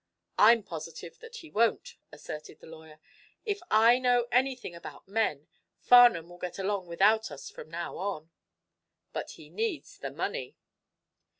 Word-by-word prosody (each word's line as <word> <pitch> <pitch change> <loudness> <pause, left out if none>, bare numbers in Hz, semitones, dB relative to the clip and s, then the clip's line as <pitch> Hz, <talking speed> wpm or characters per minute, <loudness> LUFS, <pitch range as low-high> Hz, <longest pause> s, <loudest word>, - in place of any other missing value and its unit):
"I'm 225 +1 +7
positive 165 0 -8
that 465 +1 -12
he 325 -9 -11
won't," 230 0 0
asserted 150 0 -9
the - - -15
lawyer. 160 -1 -13 0.5
"If 410 -2 -1
I 230 +3 +5
know 245 -1 +2
anything 250 -5 0
about 170 - -11
men 195 -8 -1 0.3
Farnum 240 -9 +6
will 175 0 -13
get 180 -1 -5
along 195 -1 -2
without 210 +6 +3
us 145 -2 -9
from 155 - -11
now 170 +1 -5
on." 170 -5 -4 0.8
"But - - -5
he - - -13
needs 435 -7 -4
the - - -5
money." - - -4
200 Hz, 145 wpm, -29 LUFS, 165-245 Hz, 0.8 s, I'm